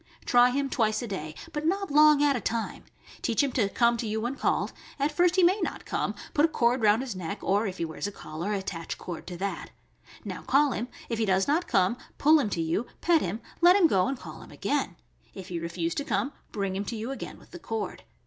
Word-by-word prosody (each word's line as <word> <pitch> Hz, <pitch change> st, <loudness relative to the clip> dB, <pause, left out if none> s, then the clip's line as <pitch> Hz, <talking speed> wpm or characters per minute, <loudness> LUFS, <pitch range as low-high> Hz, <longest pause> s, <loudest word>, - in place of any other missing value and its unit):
Try 245 Hz, 0 st, +6 dB
him 275 Hz, +2 st, 0 dB
twice 220 Hz, -4 st, 0 dB
a -, -, -4 dB
day, 155 Hz, -6 st, -5 dB, 0.2 s
but 295 Hz, -, -3 dB
not 390 Hz, +2 st, 0 dB
long 300 Hz, 0 st, +6 dB
at 285 Hz, -1 st, +4 dB
a 245 Hz, -, -2 dB
time; 230 Hz, 0 st, -3 dB, 0.4 s
teach 230 Hz, +3 st, +1 dB
him 275 Hz, -, 0 dB
to 220 Hz, -6 st, +1 dB
come 235 Hz, +2 st, +3 dB
to 230 Hz, -, -3 dB
you 215 Hz, +1 st, -1 dB
when 240 Hz, +4 st, -1 dB
called; -, -, 0 dB, 0.2 s
at 285 Hz, +2 st, +1 dB
first 355 Hz, 0 st, +3 dB
he 375 Hz, -, +4 dB
may 370 Hz, +4 st, +4 dB
not -, -, -3 dB
come; -, -, -2 dB, 0.2 s
put 290 Hz, -, +3 dB
a -, -, +7 dB
cord 245 Hz, -5 st, +1 dB
round 215 Hz, +3 st, +4 dB
his 245 Hz, -7 st, -5 dB
neck, 185 Hz, +3 st, -4 dB
or, 205 Hz, +3 st, +2 dB
if 190 Hz, -1 st, -5 dB
he 170 Hz, -, -1 dB
wears 160 Hz, +4 st, -4 dB
a -, -, -5 dB
collar, 170 Hz, +1 st, -5 dB
attach 190 Hz, -5 st, -4 dB
cord 175 Hz, -2 st, -7 dB
to 175 Hz, -1 st, -6 dB
that. 195 Hz, +2 st, -4 dB, 0.6 s
Now -, -, -5 dB
call 285 Hz, 0 st, +3 dB
him; 235 Hz, +1 st, -3 dB, 0.2 s
if 230 Hz, -2 st, -3 dB
he 225 Hz, -, +2 dB
does 190 Hz, 0 st, +2 dB
not 315 Hz, +5 st, +1 dB
come, 190 Hz, +5 st, +2 dB, 0.2 s
pull 310 Hz, +2 st, +6 dB
him 225 Hz, -, 0 dB
to 170 Hz, -, -2 dB
you, 170 Hz, +9 st, -1 dB
pet 335 Hz, -2 st, +3 dB
him, 200 Hz, +6 st, -3 dB, 0.2 s
let 350 Hz, +2 st, +7 dB
him 400 Hz, -4 st, +5 dB
go, 195 Hz, -, +3 dB
and 270 Hz, 0 st, -2 dB
call 160 Hz, -7 st, -10 dB
him -, -, -13 dB
again; -, -, -2 dB, 0.4 s
if 190 Hz, -2 st, -8 dB
he 175 Hz, -2 st, -3 dB
refuse 170 Hz, 0 st, -2 dB
to 285 Hz, -, -2 dB
come, 280 Hz, +1 st, -1 dB, 0.2 s
bring 195 Hz, -3 st, -2 dB
him 200 Hz, +1 st, -2 dB
to 235 Hz, -, -4 dB
you 225 Hz, +4 st, -4 dB
again 270 Hz, -, -6 dB
with -, -, -19 dB
the -, -, -9 dB
cord. 225 Hz, -8 st, -4 dB
230 Hz, 245 wpm, -28 LUFS, 190-280 Hz, 0.6 s, a